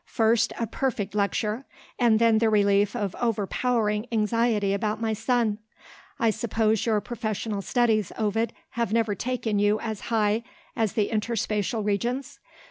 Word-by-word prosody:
"First 225 0 +2
a 230 - 0
perfect 225 -5 -2
lecture 210 +3 0 0.4
and 235 -3 +4
then 225 -1 +4
the 225 0 +3
relief 205 0 +3
of 205 -5 -2
overpowering 220 0 0
anxiety 220 -2 +1
about 215 +1 -1
my 225 -1 0
son. 225 -1 0 0.6
I 230 -1 +3
suppose 220 0 0
your 215 -2 +3
professional 215 -3 -3
studies, 220 -3 +1
Ovid, 225 +1 0 0.2
have 235 -4 -2
never 225 -2 +2
taken 225 -1 -1
you 205 +1 +3
as 220 -3 -4
high 215 -1 +2 0.3
as 225 -4 0
the 210 -2 +1
Interspacial 215 -1 -1
Regions? 240 +6 -2
220 Hz, 140 wpm, -26 LUFS, 210-230 Hz, 0.6 s, and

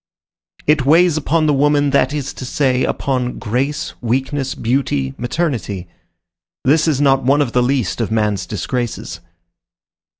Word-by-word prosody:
It 150 -2 +3
weighs 165 +4 +4
upon 155 +1 +1
the 150 - +3
woman, 145 0 +2
that 140 - +3
is 145 -2 -3
to - - -8
say, 130 0 +1
upon 125 -3 -1
grace, 130 +7 -2
weakness, 135 +3 -1
beauty, 115 - -1
maternity. 120 - -3 0.8
This 155 +5 +3
is 150 -4 +1
not 135 -2 +3
one 140 +3 +3
of 140 -5 +1
the 125 - +2
least 125 -4 0
of 115 - -1
man's 105 -3 0
disgraces. 110 -3 -4
135 Hz, 140 wpm, -18 LUFS, 120-145 Hz, 0.8 s, weighs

